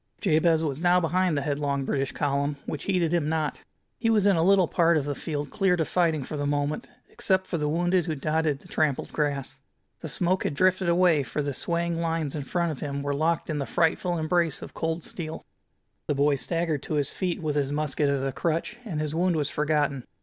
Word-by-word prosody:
Jabez 160 -3 +3
was 150 -1 -2
now 180 0 +4
behind 180 -1 +1
the 140 - -1
headlong 140 -1 -1
British 135 -1 -1
column, 140 0 -1
which 145 - -5
heeded 175 -4 +1
him 160 -3 +1
not. 155 -2 -1 0.4
He 225 - +1
was 215 -3 +3
in 200 -2 +5
a 165 - +2
little 190 0 +5
part 170 -1 +3
of 145 - -1
the 145 - -1
field 145 0 -4
cleared 190 -3 +2
of 160 - +1
fighting 165 -5 +1
for 155 - -6
the 145 -1 -1
moment, 145 +1 -1 0.2
except 190 0 0
for 170 - -3
the 150 0 0
wounded 175 +2 +1
who 160 - -1
dotted 155 +1 0
the - - -16
trampled 150 -4 0
grass. 145 -3 -2 0.4
The - - -6
smoke 185 +2 0
had 145 - -2
drifted 185 +2 +2
away, 170 -3 +4
for 145 +2 -3
the 140 -1 -2
swaying 170 +3 -1
lines 165 -3 -1
in 145 -3 -4
front 170 +2 0
of 145 - -6
him 140 -1 -3
were 140 0 -1
locked 160 +3 0
in 155 -2 -2
the 140 - -3
frightful 175 +1 +1
embrace 165 -1 0
of - - -9
cold 165 0 -2
steel. 160 -2 -6 0.6
The 145 - +1
boy 145 +1 +3
staggered 165 +1 -1
to 155 - -3
his 145 -2 0
feet, 180 -3 -2
with 155 -3 -2
his 140 -1 0
musket 145 -1 0
as 140 -1 0
a 135 - -1
crutch, 165 - -2
and 180 -10 -4
his 155 -1 -2
wound 175 +1 +2
was 150 -2 -1
forgotten. 150 -3 0
155 Hz, 220 wpm, -26 LUFS, 145-170 Hz, 0.6 s, in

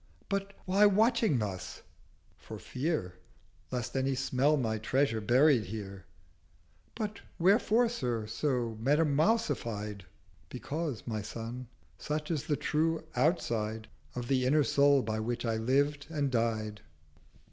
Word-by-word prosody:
'—'But 200 0 -2
why 195 +3 +5
watching 220 - +3
thus?'—'For 100 -5 -8
fear 125 - -3 0.5
Lest 125 -1 -4
any 135 0 +1
smell 130 +3 +2
my 110 -4 -1
Treasure 120 0 +1
buried 125 +1 +4
here.' 100 -1 -7 0.9
'But 215 -1 -4 0.2
wherefore, 215 +6 +4
Sir, 125 - -2
so 120 -1 -2
metamousified?' 140 - +1 0.4
'Because, 150 -5 -4
my 110 -3 -3
Son, 115 +4 -6 0.3
such 150 +2 -3
is 155 -1 -2
the 150 -3 +1
true 160 +1 0
outside 115 -7 0 0.3
Of 120 -1 -4
the 130 -1 +2
inner 150 +3 +4
Soul 140 -1 +4
by 110 0 -2
which 120 +2 -2
I 115 -1 0
lived 140 +5 +1
and 145 -4 -1
died.' 110 -3 -1
130 Hz, 120 wpm, -31 LUFS, 110-155 Hz, 0.9 s, why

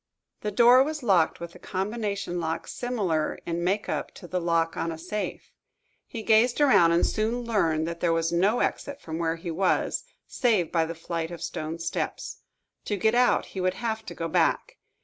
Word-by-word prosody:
The 210 - -3
door 240 +4 +6
was 300 0 -2
locked 185 -8 +3
with 170 0 -7
a - - -14
combination 200 -2 -3
lock 160 -1 -3
similar 195 -11 -1
in 170 0 -2
make 195 +4 0
up - - -2
to 175 - -11
the 180 +1 -2
lock 165 -1 +1
on 165 - -2
a 160 - -6
safe. 185 +6 -5 0.6
He 230 -4 -6
gazed 230 +4 +4
around, 260 - +5
and 170 +1 +3
soon 225 +3 -1
learned 165 -9 +1
that 170 0 -5
there 170 -1 +1
was 165 0 +1
no 195 +7 +2
exit 285 0 -2
from 160 - -6
where 165 -1 0
he 170 +1 -6
was, 185 +3 0 0.2
save 220 -10 +1
by 165 -2 +2
the 165 +1 -6
flight 165 0 -4
of 170 -1 -7
stone 155 +1 -4
steps. 165 0 -4 0.5
To 205 - -1
get 220 +3 +2
out, 245 0 +3
he 190 - -3
would 185 0 0
have 220 +1 -3
to 175 - -7
go 165 - -3
back. - - +1
185 Hz, 195 wpm, -26 LUFS, 165-220 Hz, 0.6 s, door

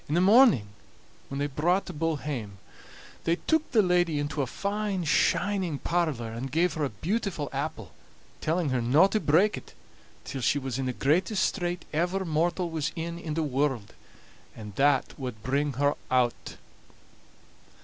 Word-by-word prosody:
In 150 - +1
the - - +4
morning, 210 - +6 0.6
when 140 - -5
they 140 - 0
brought 165 +7 +1
the 185 - -7
bull 165 +1 0
hame, 120 -9 -5 0.7
they 165 - +3
took 315 - 0
the 220 -5 +4
lady 175 -3 +2
into 145 +1 -2
a 135 - -1
fine 200 - -2
shining 180 +1 +1
parlor, 155 -10 -1
and 125 +3 -5
gave 170 +4 +2
her 155 - -2
a 140 - 0
beautiful 170 - -2
apple, 140 - -4 0.5
telling 165 -1 0
her 130 -2 0
no 135 +10 +5
to 215 +2 +1
break 185 +6 +3
it - - -12 0.5
till 135 - -6
she 140 - +2
was 135 -2 -3
in 130 - -1
the - - 0
greatest 185 - +1
strait 175 -2 -2
ever 180 +5 0
mortal 170 +2 0
was 160 -1 -2
in 170 0 -4
in 155 -3 -4
the 165 - 0
world, 135 -6 -1 0.6
and 105 -2 -9
that 140 +3 +2
wad 125 -5 -6
bring 140 +3 0
her 145 +3 +2 0.2
o't. 125 -2 0
155 Hz, 170 wpm, -27 LUFS, 135-180 Hz, 0.7 s, morning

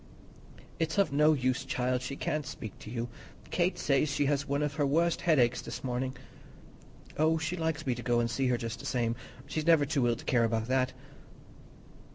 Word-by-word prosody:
"It's 160 +1 -1
of 195 -8 +3
no 150 +2 +5
use, 130 -1 0
child; 130 -1 -1
she 130 +2 -4
can't 150 0 -2
speak 110 -7 -7
to - - -9
you. 120 +1 -3 0.4
Kate 180 +1 +1
says 140 +2 +2
she 145 +1 +1
has 140 0 0
one 140 +1 0
of 150 -1 -1
her 145 - 0
worst 165 +4 +2
headaches 125 -8 +3
this - - -7
morning." 130 +1 -2 1.0
"Oh, 160 +1 +4
she 160 +2 -2
likes 160 -3 -2
me 130 - +1
to 120 - -6
go 120 -1 +2
and 120 - +2
see 130 +3 0
her 125 -1 +2
just 115 0 -5
the - - -6
same; 115 -2 0 0.3
she's 155 +3 -3
never 160 -4 +6
too 140 -4 +1
ill 120 - +2
to - - -11
care 120 -2 +3
about 110 -1 0
that." 130 0 +2
135 Hz, 205 wpm, -30 LUFS, 125-155 Hz, 1.0 s, never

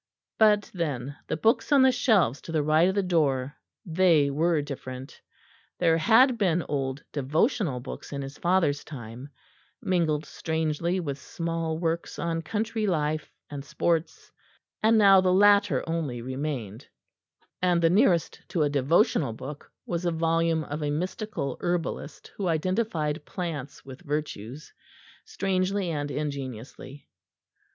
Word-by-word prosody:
But 210 -2 +4
then 145 -6 -3
the - - -2
books 225 - +1
on 280 -2 +6
the 265 - +6
shelves 215 - +2
to - - -8
the 155 -2 +1
right 155 +4 +4
of 190 - -2
the 200 - +1
door, 145 -6 +1 0.3
they 165 -5 +3
were 160 +3 +2
different; 130 -2 -8 0.6
there 165 -2 +3
had 235 - +5
been 175 -4 +1
old 135 -1 -2
devotional 150 - 0
books 125 - -8
in 140 -1 -4
his 135 +1 -8
father's 170 -5 +1
time, 125 -1 -9 0.5
mingled 155 -5 0
strangely 160 +3 -1
with 145 -5 -4
small 165 0 -3
works 165 0 -2
on 165 -1 -2
country 215 +5 -2
life 155 -4 -1 0.2
and 145 -2 -7
sports; 160 +2 -2 0.5
now 210 -4 +6
the 185 -1 +2
latter 200 -5 +4
only 160 -7 -2
remained, 130 -5 -5 0.7
and 180 -1 +3
the 165 - +5
nearest 180 -3 +2
to 165 - 0
a 145 - +1
devotional 145 - +2
book 140 +6 -9
was 170 0 -3
a 175 - +1
volume 165 0 +1
of 150 +1 -5
a 145 - -1
mystical 175 - -3
herbalist 175 -4 -3
who 195 - -2
identified 165 -2 -1
plants 155 -7 -6
with 135 +2 -10
virtues, 150 -4 -5 0.5
strangely 195 - -1
and 145 -2 -3
ingeniously. 140 -2 -6
160 Hz, 135 wpm, -27 LUFS, 145-185 Hz, 0.7 s, on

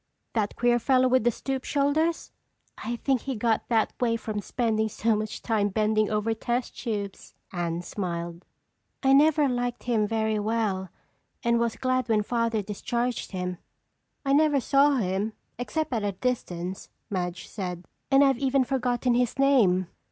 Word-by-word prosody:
"That 210 -3 -1
queer 240 0 +3
fellow 255 +1 +3
with 255 -2 +3
the - - +6
stoop 265 +3 -3
shoulders?" 300 +4 0 0.4
"I 235 +2 -4
think 260 0 0
he 270 -2 -3
got 225 0 0
that 225 -2 +2
way 230 -2 +2
from 215 -2 -4
spending 220 0 0
so 225 +1 +1
much 215 0 -4
time 210 -3 +1
bending 215 +1 +1
over 215 +1 0
test 240 +2 -2
tubes," 205 -4 -5 0.2
Anne 175 -1 -2
smiled. 170 -3 -4 0.6
"I 270 0 +5
never 300 +1 +5
liked 245 -1 -2
him 225 -4 +1
very 220 -1 0
well 205 -3 -1 0.5
and 235 0 +3
was 235 -1 0
glad 255 -2 0
when 215 -2 +3
Father 230 -1 0
discharged 235 +4 -2
him." 180 -2 -4 0.7
"I 275 - +2
never 295 -1 +4
saw 280 +2 +4
him 205 -1 -1 0.3
except 310 +3 -2
at 225 -3 0
a 200 -1 -1
distance," 185 -5 -3 0.2
Madge 180 -2 -3
said, 180 -3 -5 0.2
"and 275 +1 +6
I've 270 -3 +3
even 270 -1 +2
forgotten 250 -1 0
his 245 +1 +1
name. 230 -10 +4
230 Hz, 160 wpm, -27 LUFS, 205-255 Hz, 0.7 s, the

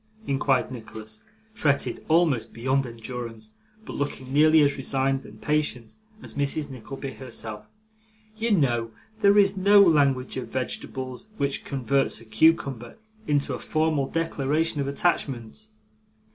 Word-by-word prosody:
inquired 135 -3 +1
Nicholas, 110 -2 -9 0.3
fretted 140 -9 0
almost 155 -7 +2
beyond 130 +3 0
endurance, 115 -1 -7 0.3
but - - -7
looking 135 -2 -4
nearly 155 +1 +6
as 145 0 +2
resigned 135 0 0
and - - -14
patient 150 -7 -1 0.3
as - - -6
Mrs. 145 +1 -1
Nickleby 135 +2 -7
herself. 115 -4 -6 0.7
'You 225 +2 -1
know, 120 - +2 0.3
there 200 -1 +5
is 200 -1 +5
no 200 +2 +6
language 140 -9 +3
of 130 - -4
vegetables, 130 - -5
which 140 -4 -1
converts 135 0 0
a 115 - -15
cucumber 120 0 +1 0.3
into 145 -1 +1
a - - -4
formal 155 -3 0
declaration 155 -1 -1
of 140 - -2
attachment. 135 -8 -1
135 Hz, 130 wpm, -25 LUFS, 125-155 Hz, 0.7 s, nearly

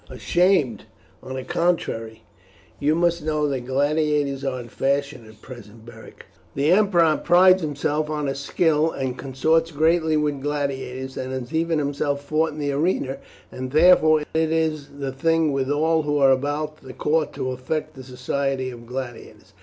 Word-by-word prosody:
"Ashamed! 175 -8 +1 0.4
on 130 - -7
the 130 - -4
contrary, 130 -9 -2 0.6
you 150 +2 +2
must 170 0 +1
know 150 -1 0
that 130 -3 -3
gladiators 145 0 0
are 130 -2 -2
in 120 - -8
fashion 140 -1 -2
at 110 0 -17
present, 115 -3 -12
Beric. 115 -1 -13 0.3
The 145 +4 +2
emperor 175 -6 +4
prides 185 +2 +5
himself 150 0 -2
on 150 -1 -2
his 135 0 -3
skill, 155 +2 +1
and 130 -5 -3
consorts 160 +5 0
greatly 160 +1 +2
with 145 -2 -1
gladiators, 135 -2 -4
and 130 0 -4
has 130 0 -5
even 165 0 +1
himself 145 0 -2
fought 155 +2 +1
in 150 - -10
the 145 -1 -1
arena, 140 -2 -1 0.3
and 130 0 -6
therefore 155 0 +5
it 160 0 +1
is 160 -3 0
the 135 -1 -3
thing 165 +3 +1
with 135 -1 -1
all 160 +2 +2
who 145 -1 -1
are 135 -2 +5
about 145 +3 -1
the 130 -3 -12
court 155 +2 0
to 130 - -3
affect 130 +5 -4
the 130 - -11
society 130 +1 -2
of 120 -1 -12
gladiators. 125 -1 -8
145 Hz, 165 wpm, -23 LUFS, 130-160 Hz, 0.6 s, prides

